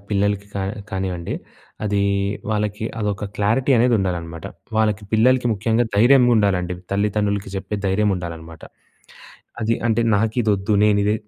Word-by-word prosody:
పిల్లలకి 100 0 0
కా 100 - -2 0.3
కానివ్వండి, 95 -3 -3 0.5
అదీ 100 -1 0 0.5
వాళ్ళకి 105 0 -1
అదొక 105 -1 -2
క్లారిటీ 115 +7 +2
అనేదుండాలనమాట. 90 -9 0 0.3
వాళ్ళకి 105 -1 +1
పిల్లలకి 125 +3 +3
ముఖ్యంగా 110 +3 +1
ధైర్యంగుండాలండి. 105 -7 +4 0.2
తల్లితండ్రులకి 100 -1 0
చెప్పే 95 +2 -4
ధైర్యముండాలనమాట. 90 -5 -2 1.0
అది 115 +1 +1
అంటే, 115 +1 +2 0.2
నాకిదొద్దు, 105 -2 +1
నేనిదే 105 0 +3
105 Hz, 100 wpm, -21 LUFS, 95-110 Hz, 1.0 s, ధైర్యంగుండాలండి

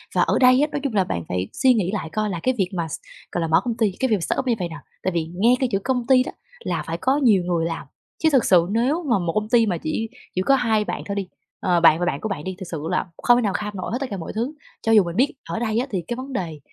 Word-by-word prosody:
Và - - +4
ở - - +2
đây 255 +1 +6
á, 300 - +3
nói - - -2
chung 275 -5 -2
là 200 -3 +3
bạn 85 - -3
phải 90 +1 -2
suy 260 -2 +4
nghĩ 195 -6 0
lại 190 -6 -3
coi 215 +5 -1
là 180 -4 -3
cái 255 - +2
việc 190 -3 +1
mà 170 -3 -2
s - - -6 0.3
gọi 175 - -1
là, 165 - 0
mở 160 - +4
công 240 -2 -2
ty, 220 -4 +2
cái 260 - +1
việc 220 - +4
mà - - -2
startup 260 - -1
như 245 - +3
vầy 175 -2 -2
nè. 165 - -7 0.3
Tại 185 - 0
vì 165 -2 -2
nghe 230 +7 +4
cái 260 - +1
chữ 195 - +1
công 250 -2 -1
ty 260 -1 +5
đó - - -6 0.3
là 170 - -3
phải 165 - -2
có 265 +9 +1
nhiều 220 -10 +4
người 175 -2 0
làm. 165 -4 -4 0.4
Chứ 320 - +6
thực 265 -4 +4
sự 175 -2 +5
nếu 260 +10 +1
mà 235 - +3
một 170 -2 -2
công 215 0 -1
ty 235 -2 +5
mà 185 -5 -1
chỉ 220 +8 -3 0.3
chỉ 185 - +1
có 275 +8 +4
2 220 -5 +1
bạn - - -4
thôi 200 - -3
đi, 200 -2 -3 0.3
ờ, 180 -2 +2
bạn 165 -1 +6
và 175 - 0
bạn 160 -6 -2
của 220 - -3
bạn 180 -7 -4
đi, 185 +2 -4
thực 185 - -6
sự 155 -3 -4
là 180 - 0 0.2
không 240 0 +6
thể - - +2
nào 205 -4 0
kham 210 +2 -3
nổi 185 - -4
hết 235 - 0
tất 275 - -1
cả 200 - -4
mọi 165 - -6
thứ. 240 +7 -2 0.3
Cho 225 - 0
dù 215 -3 +7
mình 170 -1 -5
biết 265 +7 +2 0.2
ở - - -2
đây 225 -1 0
á, 255 - -1
thì 190 -4 -1
cái 240 - -2
vấn 260 +2 -7
đề 165 -11 -4
210 Hz, 325 wpm, -23 LUFS, 175-245 Hz, 0.4 s, dù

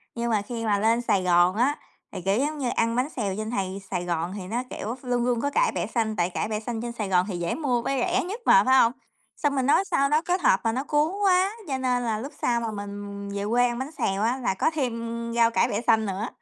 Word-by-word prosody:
Nhưng 235 0 -2
mà 210 - +2
khi 230 +2 -5
mà 205 -2 +2
lên 225 +3 +2
Sài 205 -6 +1
Gòn 175 +1 +4
á, 260 +6 +2 0.4
thì, - - -6
kiểu, 195 +5 +1
giống 300 +3 -1
như 265 -4 -1
ăn 230 0 +1
bánh 255 +4 0
xèo 205 -10 -3
trên 215 0 -3
này 195 -3 -3
Sài 180 -2 -2
Gòn 170 +1 -2
thì 185 - -7
nó, 235 +5 -2
kiểu, 225 +3 -4
luôn 245 -1 0
luôn 245 -2 +1
có 285 - 0
cải - - +2
bẹ - - -2
xanh, 220 -3 -1
tại 175 -2 +1
cải 185 - -2
bẻ 215 - -1
xanh 225 0 -4
trên 240 - -4
Sài 215 -4 -4
Gòn 180 -1 +3
thì 180 - -3
dễ 170 0 -1
mua 255 -6 0
với 270 +2 -1
rẻ - - +1
nhất 410 +7 -6
mà, 195 - +7
phải 260 0 +5
hông? 230 - +5 0.5
Xong 290 -2 0
mình 265 - +1
nói 295 +8 +4
sao 275 -6 +1
nó 305 +2 +3
kết 360 +2 -1
hợp 190 - +4
mà 225 - +1
nó 255 +4 -2
cuốn 300 +3 +1
quá, 375 +1 +4 0.2
cho 270 - -1
nên 250 -1 0
là 220 -2 -1
lúc 275 +6 -7
sau 235 -1 +1
mà 225 - -3
mình 200 -1 -7
về 200 0 -3
quê 245 +1 +3
ăn 240 0 -3
bánh 265 +3 -4
xèo 195 -10 -1
á, 245 +3 +1
là 245 -6 -1
có 190 - +1
thêm 235 -5 -3
rau 230 -1 +4
cải 235 - +2
bẹ 210 0 -1
xanh 220 -2 +3
nữa. 195 +3 -3
230 Hz, 280 wpm, -25 LUFS, 200-260 Hz, 0.5 s, mà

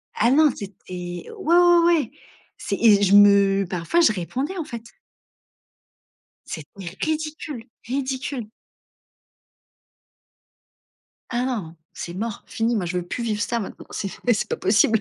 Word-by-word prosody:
Ah 235 +3 +3
non 305 +2 +6
c'était 200 -1 -7 0.2
ouais, 175 - -6 0.2
ouais, 350 -1 +6
ouais, 335 -4 +2 0.5
c'est 200 - -3
et 210 -3 +6
je 200 0 +4
me 200 -1 +6
parfois 180 - 0
je 235 - +5
répondais 260 - -3
en 325 - -3
fait. 235 -6 -7 1.6
C'était 155 -3 -8 0.3
ridicule, 305 -5 -3 0.2
ridicule! 260 -2 -3 2.8
Ah 245 +1 -1
non, 195 -11 -4 0.2
c'est 170 - -6
mort, 220 +3 -4
fini 230 0 0
moi 190 -4 -1
je 180 +1 -2
veux 175 0 -4
plus 240 - -4
vivre 215 -1 -1
ça 235 0 -1
maintenant. 200 - -7
C'est 195 - -3 0.2
mais 240 - +5
c'est 210 - -2
pas - - -2
possible. 205 +3 +3
225 Hz, 140 wpm, -23 LUFS, 195-270 Hz, 2.8 s, non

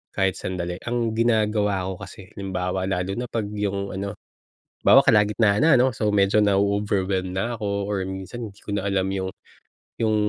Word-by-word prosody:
kahit 95 -1 +1
sandali. 90 -1 -4
Ang 120 -1 0
ginagawa 105 -4 +1
ko - - -3
kasi, 95 -1 -11
halimbawa 95 -1 -2
lalo 90 0 -1
na 125 - -3
'pag 110 -3 -3
yung 100 -1 -2
ano, 100 +2 -4 0.7
halimbawa - - +8
kalagitnaan 105 +2 +4
na, 165 - +6
ano? 130 - +5
So 105 -1 0
medyo 100 +1 +4
na-o-overwhelm 100 -2 +1
na 115 +6 -2
ako 105 - -7 0.2
or 100 -2 -1
minsan 95 +4 -6
hindi 100 - -21
ko 100 - -4
na 100 - -2
alam 95 -1 0
yung 95 -1 -3 0.7
yung, 110 -1 +1
100 Hz, 170 wpm, -24 LUFS, 95-105 Hz, 0.7 s, halimbawa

